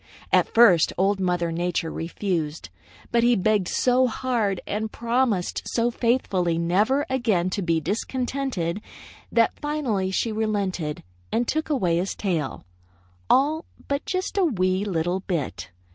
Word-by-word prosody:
At - - +4
first 200 -9 +6
Old 195 +2 +2
Mother 175 -2 0
Nature 170 -1 -1
refused, 165 -2 -3 0.4
but 235 - +3
he 240 +1 +4
begged 205 -1 +2
so 255 0 +3
hard 225 -6 -1
and 215 +1 -3
promised 235 -5 0
so 235 0 +1
faithfully 195 -9 +1
never 210 +12 +2
again 215 -9 +1
to 200 - -2
be 165 -3 +1
discontented, 215 - -2 0.5
that 230 -1 +2
finally 270 -11 -1
she 220 +4 0
relented 200 -8 -2 0.3
and 235 +1 0
took 315 +1 -1
away 185 - +1
his 185 +3 -2
tail, 165 - -2 0.6
all 300 +5 +3 0.2
but 280 0 -1
just 370 +2 -1
a - - +4
wee 185 - +1
little 175 -2 -1
bit. 170 - -3
205 Hz, 135 wpm, -24 LUFS, 175-245 Hz, 0.6 s, first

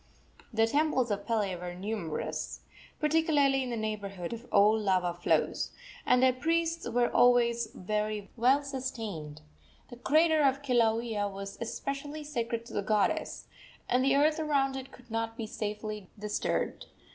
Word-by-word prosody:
The 225 -1 +3
temples 265 -2 +1
of 200 0 -3
Pele 210 -5 0
were 175 0 -6
numerous, 190 -4 -4 0.4
particularly 300 -3 +3
in 255 - -3
the 235 - -2
neighborhood 200 -4 -4
of 230 - -8
old 210 +2 +5
lava 185 -3 +1
flows, 175 - 0 0.4
and 250 +1 +5
their 260 -1 +5
priests 330 +2 0
were 240 0 +2
always 235 -2 +4
well 215 +7 0
sustained. 225 - -5 0.5
The 245 - -9
crater 315 +4 +3
of 275 0 +2
Kilauea 230 -4 +1
was 195 0 -7
especially 275 +6 -4
sacred 235 -5 -3
to - - -11
the - - 0
goddess, 210 0 0 0.4
and 250 +1 +2
the 270 +1 +3
earth 305 +3 +3
around 280 -3 +1
it 265 0 -7
could 245 -2 -16
not 225 0 -2
be 225 - -3
safely 210 -2 -5
disturbed. 210 0 -2
235 Hz, 145 wpm, -30 LUFS, 210-270 Hz, 0.5 s, old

